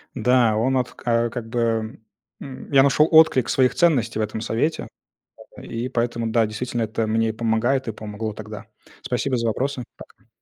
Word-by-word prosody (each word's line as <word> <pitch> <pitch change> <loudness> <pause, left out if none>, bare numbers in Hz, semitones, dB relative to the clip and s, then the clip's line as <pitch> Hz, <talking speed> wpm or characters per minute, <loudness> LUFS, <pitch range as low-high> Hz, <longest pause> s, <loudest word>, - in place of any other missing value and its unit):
Да, 125 -2 +3
он 130 +4 +1
вот 125 -2 -1
ка 120 0 0
как 115 -1 -6
бы, 115 -2 -1 0.4
м, 135 +1 -10
я 135 -1 +6
нашел 145 +2 +4
отклик 155 -6 +5
своих 130 -1 +2
ценностей 125 -11 +2
в - - +1
этом 110 +1 -3
совете. 115 +9 -1 0.7
И 120 +2 -5
поэтому, 120 -2 -1
да, 115 0 +3
действительно, 120 +2 -3
это 110 +1 -2
мне 115 +1 +1
и - - 0
помогает, 115 +4 0
и - - -1
помогло 110 0 -6
тогда. 105 0 -9 0.4
Спасибо 125 +1 -1
за 115 0 -1
вопросы. 130 +3 -2
Пока. - - -16
115 Hz, 175 wpm, -22 LUFS, 110-130 Hz, 0.7 s, я